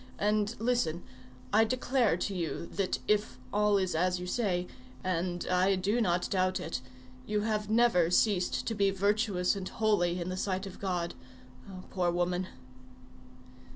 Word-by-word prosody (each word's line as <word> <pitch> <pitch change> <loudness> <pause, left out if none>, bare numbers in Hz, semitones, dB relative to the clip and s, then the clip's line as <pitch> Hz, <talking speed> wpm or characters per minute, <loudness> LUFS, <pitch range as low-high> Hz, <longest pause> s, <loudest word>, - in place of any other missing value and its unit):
And 210 +2 +1
listen! 225 -8 0 0.5
I 220 +2 +6
declare 250 -3 +1
to 195 +2 -2
you 170 -2 -3
that 195 -2 0
if 205 -12 +1 0.2
all 210 0 +3
is 185 -2 0
as 180 +2 +1
you 180 - -5
say,—and 180 - -2
I 185 +2 +3
do 205 +6 0
not 175 -4 +1
doubt 185 -1 +1
it,—you 130 +5 -5
have 210 -1 -1
never 220 -7 +4
ceased 185 0 +2
to 230 - -1
be 200 -2 +2
virtuous 200 -1 +1
and 190 -2 -5
holy 180 -5 +1
in 175 +1 -3
the 185 - -3
sight 190 0 -2
of 195 - -9
God. 180 -3 -2 0.6
Oh! 185 -1 -9
poor 180 -2 +1
woman." 175 +1 0
185 Hz, 150 wpm, -30 LUFS, 175-210 Hz, 0.6 s, I